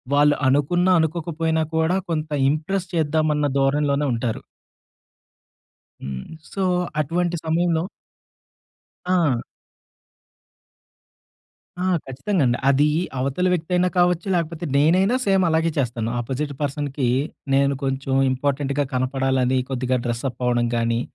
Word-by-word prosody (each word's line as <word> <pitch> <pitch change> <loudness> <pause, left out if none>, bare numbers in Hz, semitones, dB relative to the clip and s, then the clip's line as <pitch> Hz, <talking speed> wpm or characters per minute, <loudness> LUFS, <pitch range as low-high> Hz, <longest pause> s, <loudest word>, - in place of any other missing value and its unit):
వాళ్ళు 145 0 +5
అనుకున్న 145 +7 +2
అనుకోకపోయినా 160 0 0
కూడా, 160 +3 +2
కొంత 155 -1 -2 0.2
ఇంప్రెస్ 175 +5 -2
చేద్దామన్న 155 -1 +1
ధోరణిలోనే 140 +1 +1
ఉంటారు. 115 -1 -2 1.6
హ్మ్. 65 -1 -5 0.3
సో, 195 - -2 0.4
అటువంటి 170 +3 0
సమయంలో 165 0 +1 1.3
ఆ! 165 -10 +2 2.4
ఆ! 180 - -2 0.2
ఖచ్చితంగండి. 135 -1 0
అది 140 +2 +4 0.3
అవతల 140 +8 0
వ్యక్తయినా 180 +1 +1
కావచ్చు 175 0 +2
లేకపోతే 170 -1 -2
నేనైనా 185 - +3
సేమ్ 195 -1 +3
అలాగే 160 +1 +2
చేస్తాను. 115 -4 -1
అపోజిట్ 140 +4 -3
పర్సన్‌కి 140 -2 -2 0.5
నేను 140 0 +3
కొంచెం 135 0 -1 0.2
ఇంపార్టెంట్‌గా 140 +1 -1
కనపడాలని 130 0 +1
కొద్దిగా 130 0 0
డ్రెస్సప్ 120 +1 -3
అవ్వడం 120 -1 +1
గానీ, 115 0 0
145 Hz, 100 wpm, -22 LUFS, 130-165 Hz, 2.4 s, వాళ్ళు